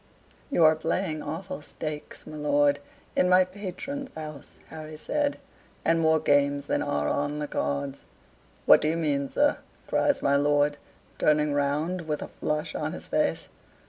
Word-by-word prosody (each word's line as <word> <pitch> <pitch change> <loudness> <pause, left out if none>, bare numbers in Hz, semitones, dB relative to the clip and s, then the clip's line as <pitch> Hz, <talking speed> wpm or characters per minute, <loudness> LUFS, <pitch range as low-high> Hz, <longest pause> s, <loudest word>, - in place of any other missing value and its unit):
"You 225 - +3
are 155 0 +7
playing 155 0 -1
awful 165 +3 -5
stakes, 150 0 -6
my 155 - -9
lord, 145 -1 +2 0.4
in 180 - +3
my 185 0 +6
patron's 205 +9 -6
house," 155 -3 -8
Harry 155 -1 -8
said, 290 - -1 0.5
"and 165 0 +3
more 160 -1 +4
games 145 -1 +2
than - - 0
are 145 0 0
on 145 +1 -1
the 150 -1 -3
cards." 140 -1 -3 0.6
"What - - +8
do - - +1
you 160 +2 +1
mean, 140 -4 0
sir?" 290 0 +2 0.3
cries 285 - +1
my 140 0 +4
lord, 145 0 +2 0.4
turning 150 -1 +3
round, 150 +5 -1
with 150 -1 -2
a - - -8
flush 150 0 -1
on - - -3
his - - -7
face. - - 0
150 Hz, 160 wpm, -27 LUFS, 145-170 Hz, 0.6 s, What